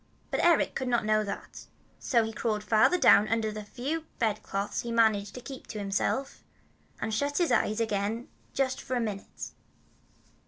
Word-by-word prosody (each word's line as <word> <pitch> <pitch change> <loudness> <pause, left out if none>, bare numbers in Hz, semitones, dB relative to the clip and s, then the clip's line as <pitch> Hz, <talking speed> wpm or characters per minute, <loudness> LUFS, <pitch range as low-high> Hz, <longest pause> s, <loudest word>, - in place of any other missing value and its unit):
But - - 0
Eric 340 -2 +4
could 260 - -3
not 240 -3 +1
know 215 0 +3
that; 200 - -7 0.3
so 235 -4 +2
he 225 0 -4
crawled 210 -1 -1
farther 220 +11 +4
down 210 - +6
under 225 -1 0
the 215 0 -6
few 280 +9 -4
bedclothes 205 -2 -1
he 235 - -6
had 230 - -2
managed 210 -3 +3
to 250 - -7
keep 265 +1 -9
to 220 - -6
himself, 205 +7 -1 0.6
and 220 - -2
shut 285 +6 0
his 350 -2 +2
eyes 215 +2 +2
again 220 +1 -1 0.2
just 265 -1 0
for 255 - -3
a - - +1
minute. 210 -4 -5
225 Hz, 180 wpm, -29 LUFS, 210-255 Hz, 0.6 s, down